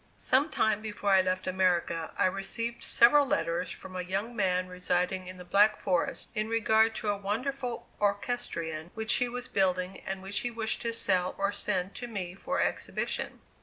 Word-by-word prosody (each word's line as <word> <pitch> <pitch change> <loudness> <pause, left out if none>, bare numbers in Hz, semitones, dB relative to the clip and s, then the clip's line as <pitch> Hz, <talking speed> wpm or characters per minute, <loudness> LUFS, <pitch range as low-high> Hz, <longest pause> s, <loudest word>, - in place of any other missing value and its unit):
Some 275 +5 +2
time 220 -7 +1
before 205 -2 -2
I 190 -1 +7
left 185 0 -1
America 180 -3 +1
I - - +3
received 230 +5 -2
several 250 +5 +6
letters 260 - 0
from 185 - -9
a 185 - -2
young 195 +6 -3
man 185 -3 +1
residing 180 0 -1
in 185 0 -8
the 180 - -10
Black 210 +4 +4
Forest 180 -3 0
in 215 -2 -1
regard 225 0 +3
to 215 - -2
a 205 - +2
wonderful 245 +5 -3
orchestrion 200 -6 -2
which 220 0 +1
he 245 - +1
was 245 +1 -5
building 185 -2 0
and 190 0 -5
which 195 +1 -1
he 245 - -2
wished 225 -2 -2
to 230 -1 -1
sell 185 -5 +1
or 200 0 +1
send 190 -2 -1
to 245 - -5
me 190 -6 -4
for 190 - -3
exhibition. - - -2
200 Hz, 180 wpm, -30 LUFS, 185-230 Hz, -, I